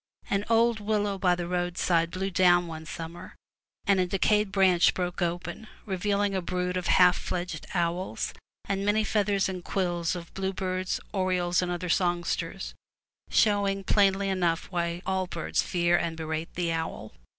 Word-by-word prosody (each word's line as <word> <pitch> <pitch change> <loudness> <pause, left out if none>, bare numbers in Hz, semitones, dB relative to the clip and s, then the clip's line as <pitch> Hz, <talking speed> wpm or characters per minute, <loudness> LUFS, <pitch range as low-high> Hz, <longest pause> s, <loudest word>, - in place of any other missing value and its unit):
An 200 +1 +1
old 230 0 +3
willow 205 -1 -1
by 180 -2 +3
the 175 -1 -4
roadside 175 -1 +1
blew 190 +2 -3
down 175 -1 +4
one 160 -1 -8
summer, 165 +1 -8 0.5
and 200 -1 +3
a 180 - +2
decayed 210 +2 +2
branch 185 -3 +4
broke 180 0 -3
open, 175 +4 -3 0.2
revealing 200 +1 0
a 190 - 0
brood 180 +1 -2
of 180 -1 -2
half 180 0 +6
fledged 175 -3 -4
owls, 175 +2 -1 0.3
and 195 0 -1
many 210 +2 +2
feathers 205 -2 +1
and 185 -2 -5
quills 175 -3 -1
of 170 -1 -8
bluebirds, 185 -1 -2
orioles, 185 -2 +1
and 180 -1 -2
other 175 +1 -3
songsters, 175 0 -1 0.6
showing 200 -2 +2
plainly 195 0 +3
enough 175 -3 0
why 170 0 -2
all 190 -1 0
birds - - -1
fear 175 -1 +1
and 165 -1 -1
berate 160 0 -4
the 170 -1 0
owl. 160 -9 -4
180 Hz, 155 wpm, -28 LUFS, 175-195 Hz, 0.6 s, half